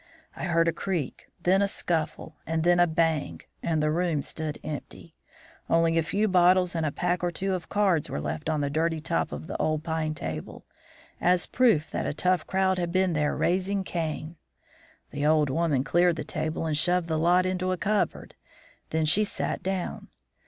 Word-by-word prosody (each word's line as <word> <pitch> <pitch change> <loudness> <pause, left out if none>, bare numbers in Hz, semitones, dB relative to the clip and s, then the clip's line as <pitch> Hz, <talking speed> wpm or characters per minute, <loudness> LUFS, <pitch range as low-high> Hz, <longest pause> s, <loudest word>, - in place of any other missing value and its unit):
I - - -4
heard 165 -2 +2
a 165 - +2
creak, 175 -9 -3 0.2
then 190 +2 +4
a 200 - +3
scuffle, 160 -4 -3
and 160 0 0
then 175 +1 +4
a 175 - +5
bang, 160 -2 0 0.2
and 160 -2 0
the 150 - +2
room 165 -3 0
stood 155 -2 -4
empty. 155 +2 -7 0.6
Only 165 0 +3
a 165 - +4
few 200 +7 0
bottles 180 -1 +4
and 165 -2 0
a - - -1
pack 175 +3 -1
or 175 - +2
two 190 +2 -2
of 180 -2 -4
cards 195 -7 +2
were - - -3
left 75 - -3
on 155 -2 0
the 140 -1 -1
dirty 160 +2 0
top 80 - -1
of 75 +2 -6
the - - -6
old 155 -1 0
pine 160 -1 -2
table, - - -6 0.6
as 180 0 +3
proof 225 -12 +2
that - - -2
a - - -3
tough 180 +1 +1
crowd 190 -1 +1
had 175 -1 -1
been 185 -1 +2
there 150 -1 0
raising 190 +2 0
Cain. 160 -2 -4 0.7
The 145 0 -4
old 150 -3 +3
woman 150 -3 +1
cleared 175 +4 +3
the 160 - -4
table 160 +1 -3
and 155 -2 0
shoved 175 +2 +2
the 160 -1 0
lot 175 +3 +4
into 185 0 -1
a 185 - -1
cupboard; 210 +3 -1 0.6
then 160 0 0
she 200 +8 +4
sat 210 - -3
down. 190 -1 -3
165 Hz, 195 wpm, -27 LUFS, 155-180 Hz, 0.7 s, a